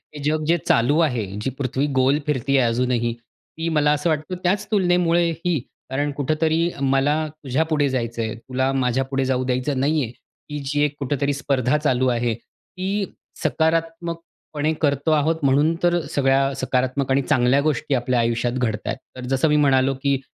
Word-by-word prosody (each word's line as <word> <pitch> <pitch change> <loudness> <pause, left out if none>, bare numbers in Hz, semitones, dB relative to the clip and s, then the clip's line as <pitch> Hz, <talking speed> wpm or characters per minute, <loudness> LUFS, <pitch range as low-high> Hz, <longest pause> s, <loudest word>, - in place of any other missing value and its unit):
हे 145 - -7
जग 155 +1 0
जे 170 +1 +4
चालू 120 +6 +3
आहे, 125 -10 +1 0.2
जी 135 - -1
पृथ्वी 135 +1 -1
गोल 130 +3 +3
फिरती 140 -1 +1
आहे 125 -3 +3
अजूनही, 120 0 0
ती 140 +7 -8
मला 150 -2 +3
असं 150 +3 0
वाटतं 155 +4 -2
त्याच 200 +4 +1
तुलनेमुळे 175 -3 +3
ही, 165 -1 -1 0.3
कारण 145 +2 -1
कुठेतरी 160 +3 +1
मला 135 +2 +2 0.3
तुझ्यापुढे 145 +2 +1
जायचं 115 -3 -2
आहे, 110 0 -3
तुला 130 +3 -2
माझ्यापुढे 135 +1 0
जाऊ 130 -1 0
द्यायचं 130 +2 -1
नाही 145 +2 +2
आहे. 115 - -5 0.4
ही 150 - -3
जी 145 +2 0
एक 145 -1 -3
कुठेतरी 140 +1 -1
स्पर्धा 140 0 +1
चालू 130 -4 +1
आहे. 120 -1 +1
ती 190 - -5 0.4
सकारात्मकपणे 165 -1 -1
करतो 145 +1 +1
आहोत, 155 +1 +2
म्हणून 145 +4 +3
तर 175 0 +3 0.2
सगळ्या 135 0 +2
सकारात्मक 130 0 -1
आणि 135 +1 +3
चांगल्या 130 -1 +2
गोष्टी 145 -1 -1
आपल्या 125 0 0
आयुष्यात 120 +1 0
घडत 110 -4 0
आहे. - - -1 0.2
तर 125 - -7
जसं 135 +4 +2
मी 150 - +3
म्हणालो, 135 0 +3
की 140 -1 +2
140 Hz, 170 wpm, -22 LUFS, 130-155 Hz, 0.4 s, जे